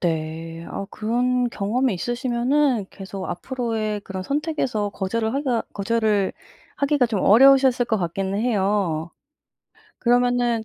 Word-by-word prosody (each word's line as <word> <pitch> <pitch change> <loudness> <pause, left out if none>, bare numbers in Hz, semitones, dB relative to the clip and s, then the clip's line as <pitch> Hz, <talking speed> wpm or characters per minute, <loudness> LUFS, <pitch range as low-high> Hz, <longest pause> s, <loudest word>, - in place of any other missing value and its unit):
네. 165 0 -3
아 200 - -5
그런 245 +3 0
경험이 230 +3 0
있으시면은 245 +2 0
계속 195 -1 -7
앞으로의 215 +1 -3
그런 190 -1 -6
선택에서 275 - -1
거절을 220 +3 -2
하기가 265 -5 0
거절을 210 -1 +1 0.4
하기가 280 -3 +2
좀 215 -4 -2
어려우셨을 260 +3 +6
것 220 - +1
같기는 190 +3 -2
해요. 195 -7 0 0.9
그러면은 245 -1 +2
225 Hz, 295 characters per minute, -23 LUFS, 195-250 Hz, 0.9 s, 어려우셨을